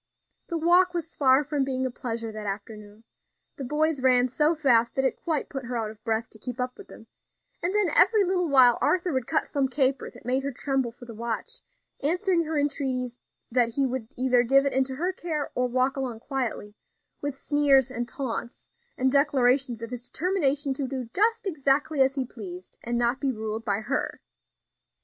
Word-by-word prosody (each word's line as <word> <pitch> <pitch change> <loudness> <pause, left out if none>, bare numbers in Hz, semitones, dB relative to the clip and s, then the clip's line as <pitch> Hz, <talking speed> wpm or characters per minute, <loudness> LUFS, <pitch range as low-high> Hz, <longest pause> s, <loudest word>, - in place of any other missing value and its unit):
The 335 - -2
walk 355 +2 +4
was 335 -1 -4
far 265 0 +4
from 290 -1 -1
being 260 -1 -1
a 260 - -2
pleasure 230 -2 -4
that 215 -1 -7
afternoon; 210 +1 -7 0.5
the 275 - -5
boys 300 +2 0
ran 255 -1 +4
so 300 +6 +2
fast 240 -6 +3
that 270 - +1
it 265 - +1
quite 315 -4 -1
put 270 -2 -6
her 245 0 -3
out 220 -2 -2
of 215 0 -17
breath 225 -1 -1
to 220 - -13
keep 250 +2 -6
up 250 0 -2
with 405 - -11
them; - - -13 0.6
and 355 +4 -1
then 415 -4 +2
every 435 -3 +5
little 360 -2 0
while 255 -4 +6
Arthur 360 -2 +1
would 260 -2 -1
cut 315 - +1
some 280 -3 0
caper 265 0 0
that - - -16
made 255 +2 +1
her 280 +1 -3
tremble 265 -2 -1
for 245 +1 -13
the 235 - -9
watch; 230 +1 -4 0.4
answering 350 +3 +1
her 315 0 -2
entreaties 260 -4 -1 0.3
that 235 -1 +2
he 275 - +2
would 255 -3 -3
either 255 -1 +3
give 270 +3 +4
it 280 - 0
into 265 0 0
her 355 +7 -1
care 315 -5 -3
or 250 0 0
walk 255 +2 +1
along 250 -5 -4
quietly, 245 -6 -3 0.5
with 285 -1 -3
sneers 275 -3 +3
and 240 -1 -3
taunts, 240 -2 -5 0.3
and 260 0 +2
declarations 260 -4 +2
of 230 - -6
his 245 -1 -4
determination 295 -6 +1
to 265 0 -3
do 255 -3 -5
just 450 +3 +2
exactly 290 -3 +1
as 265 +1 +3
he 265 -2 -1
pleased, 185 -7 -9
and 240 0 -1
not 240 +2 +1
be 275 -2 +1
ruled 220 -1 -4
by 205 -2 -1
her. 215 - -2
265 Hz, 200 wpm, -26 LUFS, 240-295 Hz, 0.6 s, while